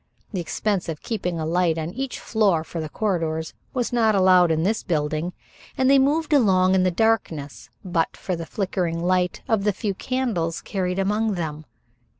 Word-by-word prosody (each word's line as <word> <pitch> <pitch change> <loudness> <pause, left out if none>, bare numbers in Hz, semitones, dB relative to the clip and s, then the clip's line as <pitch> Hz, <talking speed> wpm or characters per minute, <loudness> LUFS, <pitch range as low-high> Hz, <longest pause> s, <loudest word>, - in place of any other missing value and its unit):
The 185 - -1
expense 195 +2 -1
of 155 -2 -5
keeping 180 -7 -2
a 160 - -2
light 170 0 +1
on 160 +1 -3
each 265 +5 -4
floor 200 -8 +1
for 165 0 -5
the 155 - -5
corridors 165 -5 -2 0.2
was 245 -2 -2
not 220 -3 +3
allowed 185 -2 +5
in 160 0 +1
this 215 +4 +1
building, 155 0 -1 0.5
and 260 0 +4
they 275 - +6
moved 300 +3 +1
along 190 -8 +4
in 190 - +4
the 185 - +3
darkness, 170 -8 -1 0.2
but 170 -3 -1
for 185 - -3
the 165 -1 -6
flickering 180 -4 -2
light 180 0 +1
of 220 -3 +1
the 210 - +3
few 200 +1 -3
candles 205 -8 -2
carried 180 -2 -2
among 210 +2 +1
them. 155 -3 -4
185 Hz, 180 wpm, -23 LUFS, 165-215 Hz, 0.5 s, they